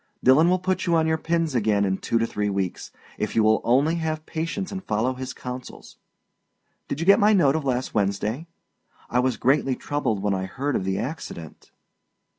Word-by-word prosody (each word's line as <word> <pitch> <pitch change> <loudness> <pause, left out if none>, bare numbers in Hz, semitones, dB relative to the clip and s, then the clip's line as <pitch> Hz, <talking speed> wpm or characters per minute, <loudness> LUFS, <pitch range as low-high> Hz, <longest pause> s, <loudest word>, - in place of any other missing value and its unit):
Dillon 145 +7 +6
will 185 - +3
put 185 0 -2
you 170 - +3
on 160 -1 +3
your 160 0 +1
pins 165 -2 0
again 105 -4 +2
in 95 0 -1
two 115 - 0
to 115 - +1
three 105 -2 -2
weeks, 95 -2 -3 0.3
if - - -2
you 110 - +4
will 110 0 +3
only 140 +8 +2
have 155 -1 -3
patience 165 +5 -4
and 190 -1 -5
follow 110 +2 0
his 130 0 -6
counsels. 125 0 -9 0.9
Did 140 - -4
you 165 - -2
get 200 +2 +6
my 210 +1 +5
note 150 -8 +4
of 155 -3 -2
last 130 -1 -1
Wednesday? 105 - -1 0.6
I 125 - +2
was 125 -2 +1
greatly 135 +1 +2
troubled 125 -10 -2
when 105 -1 +1
I 95 0 -2
heard 140 +6 -2
of 95 - -1
the 95 0 -1
accident. 120 - -7
130 Hz, 200 wpm, -24 LUFS, 110-160 Hz, 0.9 s, Dillon